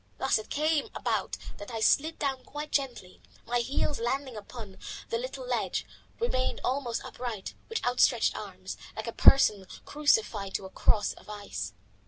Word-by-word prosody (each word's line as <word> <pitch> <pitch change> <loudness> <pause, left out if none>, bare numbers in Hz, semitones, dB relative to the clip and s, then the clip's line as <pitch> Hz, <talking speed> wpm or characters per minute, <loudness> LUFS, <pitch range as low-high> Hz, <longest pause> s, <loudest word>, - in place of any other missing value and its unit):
Thus 265 -4 +2
it 215 - -9
came 305 0 +1
about - - -1 0.2
that 205 - -8
I 230 -2 -3
slid 305 +8 +3
down 270 -3 -1
quite 295 +1 -6
gently 245 -10 -2 0.2
and, - - -30
my 245 0 +2
heels 275 +3 0
landing 260 +2 -1
upon 210 -2 -9 0.3
the 465 - 0
little - - -5
ledge, - - 0 0.3
remained 255 - 0
almost 250 -3 -1
upright, 235 -5 -5 0.2
with 450 - -2
outstretched 245 0 +4
arms - - -6 0.2
like - - -4
a - - -2
person 210 -8 +6 0.2
crucified 220 -9 +2
to 195 - -2
a 190 - -9
cross 205 +1 +3
of - - -16
ice. 100 - -5
250 Hz, 165 wpm, -30 LUFS, 210-285 Hz, 0.3 s, person